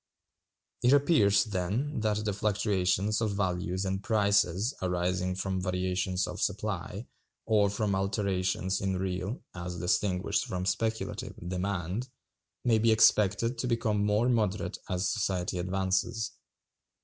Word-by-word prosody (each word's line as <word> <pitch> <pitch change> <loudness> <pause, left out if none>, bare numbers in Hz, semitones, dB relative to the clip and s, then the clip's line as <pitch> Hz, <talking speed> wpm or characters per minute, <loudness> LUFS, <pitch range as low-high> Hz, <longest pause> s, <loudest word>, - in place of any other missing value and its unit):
It 125 +3 +5
appears, 135 -9 +4
then, 105 +8 -2
that 105 -1 0
the 105 - 0
fluctuations 105 0 +1
of 105 -3 0
values 90 -1 -1
and 95 0 -2
prices 100 0 +2
arising 90 0 0
from 95 0 -2
variations 90 0 -1
of 90 - -6
supply, 100 +1 -2 0.4
or 105 -3 +3
from 105 0 -1
alterations 95 -1 0
in 95 -1 0
real 95 +5 -3
(as 90 0 -5
distinguished 90 +1 0
from 90 0 -3
speculative) 110 +4 -2
demand, 95 +5 -2 0.6
may 115 -3 +4
be 115 +1 +4
expected 110 +2 +4
to 125 - -1
become 110 -3 +1
more 105 +3 +2
moderate 105 -7 0
as 90 0 0
society 95 -5 -1
advances. 95 +5 -1
100 Hz, 125 wpm, -29 LUFS, 90-110 Hz, 0.6 s, It